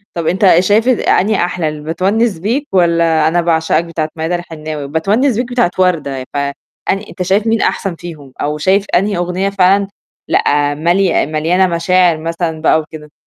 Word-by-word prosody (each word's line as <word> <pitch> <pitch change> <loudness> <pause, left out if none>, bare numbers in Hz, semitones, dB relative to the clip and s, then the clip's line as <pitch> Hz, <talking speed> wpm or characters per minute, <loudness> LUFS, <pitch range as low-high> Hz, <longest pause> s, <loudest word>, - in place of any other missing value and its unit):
طَب 170 -2 -3
أنت 185 -2 +4
شايف 205 +5 +2
أنهي 215 -4 +2
أحلى 175 -3 -1
ال 150 -1 -8
بتوَنِّس 195 +5 0
بيك 240 - -2
والّا 170 -3 +2
أنا 175 +2 +1
باعشقك 165 0 +1
بتاعة 160 -2 -3
ميادة 165 +2 -2
الحناوي؟ 155 -4 -6
بتونس 205 - +1
بيك 245 +1 -3
بتاعة 245 -7 +1
وردة 155 -8 0
ف - - -3
أن 140 0 -1 0.6
أنت - - -9
شايف 195 +4 +1
مين 225 0 +1
أحسن 195 -4 -1
فيهم 155 -6 -10
أو 150 +1 -2
شايف 190 +6 +1
أنهي 200 +2 +1
أغنية 180 +2 -1
فعلًا، 195 0 +2 0.4
لأ، 145 0 +1
ملي 175 +4 +1
مليانة 165 +5 +1
مشاعر 175 0 +2
مثلًا 165 0 -3
بقى 160 0 +3
وكده؟ 155 -1 -10
175 Hz, 165 wpm, -15 LUFS, 160-195 Hz, 0.6 s, أنت